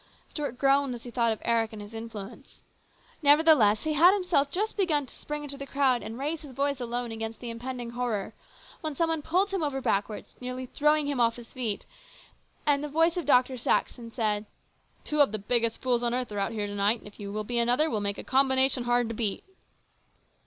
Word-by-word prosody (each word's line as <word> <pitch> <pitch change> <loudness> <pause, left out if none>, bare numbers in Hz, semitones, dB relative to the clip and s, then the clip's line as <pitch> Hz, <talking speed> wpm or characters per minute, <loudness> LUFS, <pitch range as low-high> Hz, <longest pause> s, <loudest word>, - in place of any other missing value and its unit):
Stuart 285 -5 -4
groaned 275 -1 +2
as 235 - -11
he 245 - -8
thought 235 -1 +2
of 220 - -3
Eric 230 -1 +1
and 215 - -8
his 205 +2 -10
influence. 225 +2 -9 0.6
Nevertheless, 290 -8 +5
he 310 - 0
had 345 +6 +6
himself 355 -8 +1
just 415 +8 -2
begun 315 -8 +1
to - - -15
spring 295 0 -6
into 280 -1 -6
the 275 - -6
crowd 270 -3 +2
and 225 - -7
raise 295 +4 -2
his 290 -4 -11
voice 280 +1 0
alone 240 -1 -3
against 225 0 -5
the 240 -2 -5
impending 240 0 -6
horror, 235 -4 -2 0.5
when 310 -2 -4
some 330 +3 +1
one 325 -1 -1
pulled 370 +6 +1
him 385 -2 -1
over 285 -3 -1
backward, 205 -3 -1
nearly 255 +1 -5
throwing 300 +3 +2
him 285 -3 -2
off 230 -1 +3
his 240 -1 -12
feet, 235 -6 -2 0.8
and 290 -1 +2
the - - -2
voice 325 +3 +2
of 350 -4 -3
Dr. 255 -1 +4
Saxon 235 0 0
said: 215 -3 -1 0.3
" - - -38
Two 300 -1 +1
of 280 - +4
the 215 - -2
biggest 230 +2 -1
fools 245 -2 +2
on 240 0 0
earth 250 -3 -2
are 205 - -3
out 200 - -1
here 215 -2 -2
to 205 - -5
night, 205 +3 +2
and 220 - -14
if 205 - -15
you 200 -1 -6
will 215 +1 -3
be 240 +3 0
another 245 +6 +3
we'll 220 -9 -1
make 200 0 -1
a - - -6
combination 265 -1 +3
hard 240 -1 +2
to 230 - -4
beat 215 -3 -1
250 Hz, 225 wpm, -28 LUFS, 225-290 Hz, 0.8 s, had